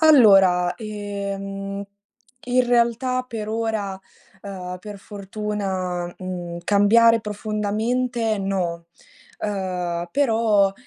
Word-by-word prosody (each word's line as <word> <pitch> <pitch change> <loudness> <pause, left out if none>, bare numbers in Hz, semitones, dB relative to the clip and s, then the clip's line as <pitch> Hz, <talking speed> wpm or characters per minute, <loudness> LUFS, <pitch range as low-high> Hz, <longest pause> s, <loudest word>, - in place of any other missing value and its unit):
Allora, 195 - +6
ehm, 200 -2 -5 0.7
in 250 0 +3
realtà 245 +1 +2
per 215 -3 -5
ora, 220 -4 -2 0.4
ehm, 180 -2 -6
per 205 +2 -9
fortuna, 195 -3 -3
mhmm, 175 -2 -5
cambiare 225 +4 +5
profondamente 220 +3 -1
no. 180 -4 -2 0.5
Ehm, 180 -4 -2
però, 220 -6 +3
205 Hz, 85 wpm, -23 LUFS, 190-225 Hz, 0.7 s, Allora